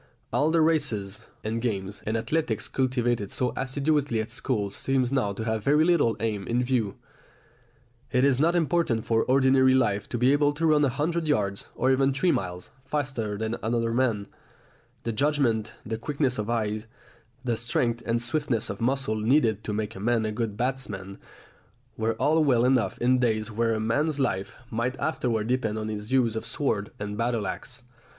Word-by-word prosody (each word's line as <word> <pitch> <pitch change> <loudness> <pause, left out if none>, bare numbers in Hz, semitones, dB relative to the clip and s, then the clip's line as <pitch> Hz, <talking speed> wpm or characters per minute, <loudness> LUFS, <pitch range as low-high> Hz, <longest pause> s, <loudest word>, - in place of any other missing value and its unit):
All 150 +2 +3
the 165 0 +3
races, 140 -12 0 0.2
and 115 +2 -2
games, 100 -4 -3
and 110 +1 +1
athletics 115 -3 -1
cultivated 120 -5 0
so 125 -2 -1
assiduously 140 -1 0
at 110 - -3
school 105 -7 -1
seem 135 +4 +1
now 125 -7 +1
to 110 - -5
have 110 -1 -1
very 150 +5 +4
little 150 -11 +3
aim 105 -3 -2
in 120 +1 +1
view. 120 -6 0 1.2
It 125 +1 +3
is 135 -2 +3
not 165 +4 +3
important 165 -9 +1
for 115 -1 +2
ordinary 130 0 +4
life 105 -6 +1
to 120 - -2
be 125 +3 +4
able 145 0 +3
to 165 +3 -1
run 150 -2 +4
a 140 - +3
hundred 160 +5 -1
yards, 100 -9 0
or 130 +2 +2
even 135 +1 +3
three 175 +5 +3
miles, 90 - -3
faster 130 -7 -2
than 110 +2 -2
another 115 0 0
man; 115 -5 +1 0.8
the 115 - -1
judgment, 120 -4 +1
the 110 0 -3
quickness 135 -2 -1
of 105 +1 -3
eye, 110 -2 -1 0.6
the 120 -2 0
strength 120 +1 -1
and 115 0 0
swiftness 120 -3 -1
of - - -8
muscle 130 -2 0
needed 110 -2 +2
to - - -2
make 105 +1 -3
a - - -7
man 115 +1 +1
a 110 - -1
good 105 -2 -3
batsman 110 -7 -3 0.8
were 110 +1 0
all 155 +7 +3
well 125 -5 +3
enough 125 -2 +2
in 125 +1 +3
days 110 -2 0
when 115 +1 +1
a - - -2
man's 145 +7 0
life 100 -7 -1 0.2
might 120 +3 -2
afterwards 115 -8 -1
depend 115 -4 0
on 110 0 -3
his 105 +1 -5
use 125 -4 +2
of 110 - -3
sword 115 -4 -1
and 105 0 -5
battle 115 -2 0
axe. 125 +6 -6
120 Hz, 180 wpm, -26 LUFS, 110-135 Hz, 1.2 s, very